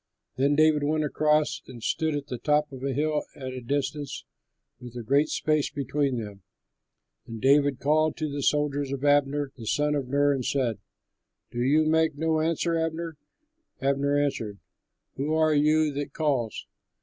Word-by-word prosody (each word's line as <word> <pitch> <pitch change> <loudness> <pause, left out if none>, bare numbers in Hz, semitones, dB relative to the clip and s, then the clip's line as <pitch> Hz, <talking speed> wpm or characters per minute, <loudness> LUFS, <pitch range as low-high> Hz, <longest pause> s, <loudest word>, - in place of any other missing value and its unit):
Then 140 +2 +2
David 155 0 +4
went 155 +1 +1
across 150 0 +1
and 120 -3 -11
stood 160 -1 0
on 145 - -2
the 125 -3 -5
top 150 +1 +1
of 130 -1 -9
a 140 - 0
hill 150 +3 0
at 130 -2 -6
a 130 - -6
distance 145 +3 -3 0.5
with 125 -1 -11
a 120 - -5
great 140 +6 +2
space 155 -2 +1
between 140 -1 -1
them. 105 -3 -7 0.9
And 115 -1 -7
David 140 +1 +3
called 155 +2 +2
to 155 - -2
the 145 -1 -4
soldiers 145 -1 +1
and 140 - -2
to 145 - +1
Abner, 145 0 +2
the 115 -4 -9
son 150 +5 +1
of 140 -3 -2
Ner, 145 +2 +2
and 135 -2 -2
said, 125 -5 -1 0.7
"Do 120 - -3
you 150 +5 +3
make 160 -1 +2
no 160 0 +1
answer, 165 +1 0
Abner?" 165 0 -2 0.6
Abner 140 +1 +1
answered, 115 -8 -1 0.6
"Who 150 +4 0
are 155 -1 +3
you 150 +1 +3
that 145 +1 -4
calls?" 135 -8 -1
145 Hz, 175 wpm, -26 LUFS, 135-155 Hz, 0.9 s, David